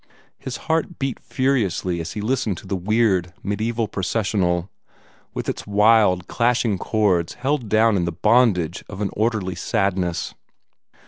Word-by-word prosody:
His 130 - -5
heart 160 +2 0
beat 135 -2 -3
furiously 100 - 0
as 80 - -6
he 105 - -4
listened 110 -4 -1
to - - -11
the 95 - -2
weird, 95 -2 +1
mediaeval 110 +3 -1
processional, 95 -3 -1 0.6
with - - -4
its - - -4
wild, 105 -3 +4
clashing 115 -4 +1
chords 95 -7 +1
held 130 -2 -1
down 110 0 +4
in 90 -3 +1
the 85 - -1
bondage 95 -3 +2
of 95 - -8
an 100 - -1
orderly 110 -4 0
sadness. 95 -5 -1
105 Hz, 140 wpm, -22 LUFS, 90-115 Hz, 0.6 s, wild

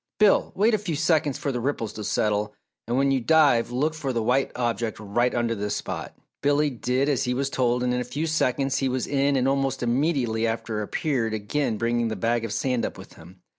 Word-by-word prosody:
"Bill, 210 -2 +4
wait 215 +4 +3
a 215 - +2
few 180 -6 -3
seconds 155 -3 +1
for 145 -4 -2
the 125 - -2
ripples 120 -4 -2
to 105 - -6
settle 105 0 0 0.3
and 120 +2 0
when 135 0 +3
you 135 - +2
dive 145 -4 +4
look 140 +6 0
for 145 -4 -3
the 115 -3 -1
white 125 +4 +1
object 120 -2 -2
right 120 +4 0
under 120 -1 +1
this 105 -1 -2
spot." - - -5 0.2
Billy 145 +1 +2
did 125 +2 0
as 140 -4 +1
he 125 0 0
was 135 +1 -1
told 125 -1 +1
and 125 0 +1
in 125 - 0
a - - -1
few 140 +6 -3
seconds 135 -4 0
he 135 - 0
was 130 0 -1
in 140 0 +1
and 130 0 +2
almost 135 -1 0
immediately 120 -3 +1
after 115 -1 -2
appeared 115 0 -1
again 110 +3 -1
bringing 120 +1 0
the 110 - -3
bag 115 +4 0
of 115 - -4
sand 125 -2 0
up - - -3
with - - -12
him. 90 +3 -16
125 Hz, 225 wpm, -25 LUFS, 115-140 Hz, 0.3 s, Bill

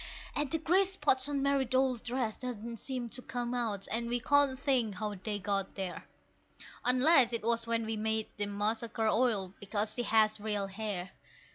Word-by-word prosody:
And 295 -1 0
the 325 - 0
grease 370 +5 +2
spots 290 -5 +1
on 280 -1 -1
Mary's 280 -3 +2
doll's 260 -2 +2
dress 240 -3 -2
don't 235 -2 -6
seem 255 -3 -3
to 245 +2 -6
come 245 -1 -4
out, 220 -5 -1
and 235 +1 -1
we 245 0 +1
can't 285 +1 +4
think 255 -7 +1
how 210 0 -3
they 205 +2 -3
got 195 0 -2
there; 190 -3 -5 0.8
Unless 255 0 +5
it 230 - -1
was 230 0 +1
when 230 -1 0
we 220 0 -2
made 220 0 0
that 205 -1 -1
Macassar 215 +3 -1 0.2
oil, 215 -6 +1
because 205 +1 -2
she 245 - -2
has 220 -2 +3
real 205 -1 -1
hair. 195 -2 -4
230 Hz, 180 wpm, -32 LUFS, 210-260 Hz, 0.8 s, Unless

